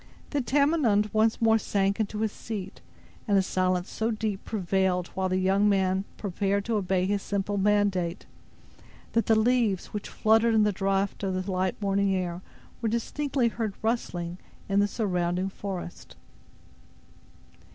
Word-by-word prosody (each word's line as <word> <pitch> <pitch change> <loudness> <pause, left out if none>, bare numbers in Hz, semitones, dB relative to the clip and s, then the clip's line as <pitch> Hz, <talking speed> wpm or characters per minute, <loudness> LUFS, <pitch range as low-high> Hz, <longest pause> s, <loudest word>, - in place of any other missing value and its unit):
Then 285 -4 -1
Tamenund 265 -7 +2
once 220 +1 +2
more 225 -1 +4
sank 200 0 0
into 215 0 -2
his 220 -1 0
seat, 205 -4 -7 0.5
and 200 -2 +3
a 190 - +4
silence 185 -1 0
so 220 +1 -1
deep 215 -3 -2
prevailed 190 -3 0
while 190 0 -2
the 185 - +1
young 195 +2 +3
man 190 -1 +1
prepared 200 0 -1
to 225 -2 0
obey 185 -2 +1
his 200 +1 0
simple 200 +1 -2
mandate, 195 -3 +1 0.9
that 230 - +1
the 220 -1 +4
leaves, 225 -5 +1
which 210 - -5
fluttered 225 +1 +3
in 215 - +5
the 210 - +3
draught 195 0 -1
of 190 -2 -1
the 185 +1 -3
light 185 0 -1
morning 200 -1 +1
air, 180 -1 -3 0.4
were 225 - 0
distinctly 255 +2 0
heard 220 -3 -3
rustling 180 -6 -2 0.3
in 195 0 +2
the 205 - +4
surrounding 180 -3 -1
forest. 190 -3 -7
200 Hz, 150 wpm, -27 LUFS, 190-220 Hz, 0.9 s, in